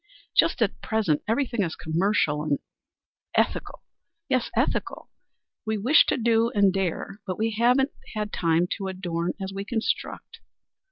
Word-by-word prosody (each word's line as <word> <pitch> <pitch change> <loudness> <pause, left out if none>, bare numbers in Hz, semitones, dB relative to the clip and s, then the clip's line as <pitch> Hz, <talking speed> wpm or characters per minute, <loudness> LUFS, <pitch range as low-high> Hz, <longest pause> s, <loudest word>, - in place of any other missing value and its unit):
Just - - +4
at - - -2
present 210 -9 +1
everything 235 0 0
is 165 -4 -1
commercial 160 -2 +1
and 150 -1 0
and - - 0 0.8
ethical; - - 0 0.4
yes, 255 -3 +1
ethical. - - -1 0.5
We 220 -1 -1
wish 250 +10 +5
to - - +1
do 230 -1 +3
and 200 -2 +4
dare, 195 +1 -2
but 185 - -3
we 225 +1 0
haven't 250 +5 +3 0.4
time 165 0 +2
to 195 - -3
adorn 180 -2 -2
as 195 0 -5
we 195 0 -4
construct. 225 +2 -3
200 Hz, 145 wpm, -26 LUFS, 175-225 Hz, 0.8 s, wish